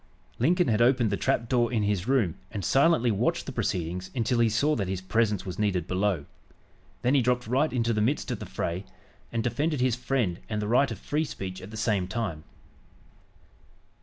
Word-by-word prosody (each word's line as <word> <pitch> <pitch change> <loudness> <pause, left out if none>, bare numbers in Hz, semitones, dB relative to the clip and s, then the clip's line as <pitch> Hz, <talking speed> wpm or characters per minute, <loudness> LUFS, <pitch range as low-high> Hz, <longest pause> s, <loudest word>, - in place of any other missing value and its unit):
Lincoln 175 +7 +3
had 110 0 +2
opened 120 -3 +4
the - - +2
trap 115 +3 0
door 120 -1 +2
in 110 -4 +1
his 100 -1 0
room 125 -11 +2 0.2
and 100 -4 -5
silently 135 -4 +4
watched 100 - 0
the - - -5
proceedings 90 +2 -2
until 120 0 +1
he 115 -1 +4
saw 145 +8 +2
that 100 -4 -2
his 95 -1 -2
presence 105 +1 0
was 90 0 -6
needed 95 -5 +1
below. 95 -4 0 0.8
Then 125 - +3
he 140 - +5
dropped 125 0 +1
right 135 +7 +1
into 115 -2 +1
the 105 - 0
midst 130 +8 0
of - - -3
the - - -7
fray, 85 +3 -3 0.5
and 115 -1 -1
defended 145 +6 0
his 125 -2 +2
friend 125 -8 -1
and 105 -1 -1
the 105 - -2
right 125 +5 +3
of - - -5
free 150 +2 -1
speech 95 -10 -6
at 95 - -9
the 110 - -8
same 105 -4 0
time. 95 -7 -3
115 Hz, 200 wpm, -27 LUFS, 95-125 Hz, 0.8 s, he